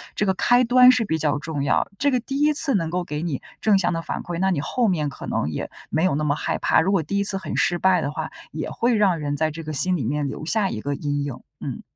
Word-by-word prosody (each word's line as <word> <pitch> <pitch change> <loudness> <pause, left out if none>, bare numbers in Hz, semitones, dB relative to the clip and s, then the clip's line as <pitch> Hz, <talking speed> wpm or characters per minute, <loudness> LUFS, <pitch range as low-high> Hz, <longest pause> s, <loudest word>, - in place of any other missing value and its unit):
这 210 - 0
个 190 - +2
开 245 +6 +3
端 250 +1 +7
是 250 -3 +1
比 160 -5 -1
较 150 -1 +1
重 145 -1 -4
要。 140 - +1
这 285 - +3
个 255 - +2
第 270 +4 -4
1 300 +1 +4
次 290 -1 +4
能 165 -5 0
够 180 +2 -2
给 150 -3 -5
你 160 -6 -2 0.2
正 210 -2 +4
向 175 -2 +1
的 165 - -2
反 - - -4
馈， 170 -1 -5
那 190 +1 +2
你 170 - 0
后 240 - 0
面 160 -7 0
可 - - -9
能 70 - -1
也 75 - -4 0.2
没 160 - +1
有 185 -6 +2
那 155 - -1
么 145 -1 +1
害 - - -2
怕。 - - +3
如 185 +4 +1
果 190 -5 +2
第 200 +7 -3
1 - - +1
次 200 -1 +2
很 190 -5 -5
失 175 - +1
败 185 -1 +3
的 140 - -2
话， - - -5 0.2
也 - - -4
会 240 0 +1
让 195 -6 +2
人 145 -1 -2
在 155 +1 +1
这 165 +2 -8
个 155 - -5
心 180 +6 +2
里 150 - -2
面 145 +5 -1
留 140 - -6
下 200 +3 +1
一 110 - -5
个 140 +3 -2
阴 145 0 -2
影， 135 -4 -6 0.2
嗯。 - - -5
170 Hz, 305 characters per minute, -23 LUFS, 150-200 Hz, 0.2 s, 端